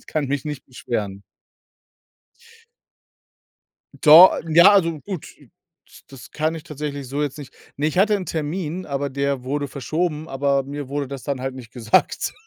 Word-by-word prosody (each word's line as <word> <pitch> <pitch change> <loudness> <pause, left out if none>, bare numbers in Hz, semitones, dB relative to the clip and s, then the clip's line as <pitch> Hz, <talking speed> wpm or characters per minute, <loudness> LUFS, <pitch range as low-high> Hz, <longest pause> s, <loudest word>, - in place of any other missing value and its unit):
Ich - - -25
kann 155 -2 -2
mich 140 0 -2
nicht 150 -3 -6
beschweren. 105 -6 -5 2.8
Do 160 +5 +10 0.2
n 160 -1 -4
ja, 175 +4 +8
also 165 -6 +2
gut, 190 -6 -7
it - - -21 0.6
das 135 -3 -13
kann 155 +2 -1
ich 160 - -7
tatsächlich 145 -2 -6
so 145 +3 -2
jetzt 145 0 -4
nicht 140 - -11 0.2
Ne, 145 +2 0
ich 155 - -3
hatte 210 +2 +4
'n 190 -3 -6
Termin, 165 +3 -4
aber 140 0 -2
der 140 -1 -2
wurde 145 +2 -2
verschoben, 155 +4 -3
aber 140 0 0
mir 140 0 -7
wurde 140 0 -3
das 135 -2 -7
dann 140 -3 -3
halt 130 0 -4
nicht 125 -2 -11
gesagt. 115 -3 +1
145 Hz, 170 wpm, -22 LUFS, 135-155 Hz, 2.8 s, Do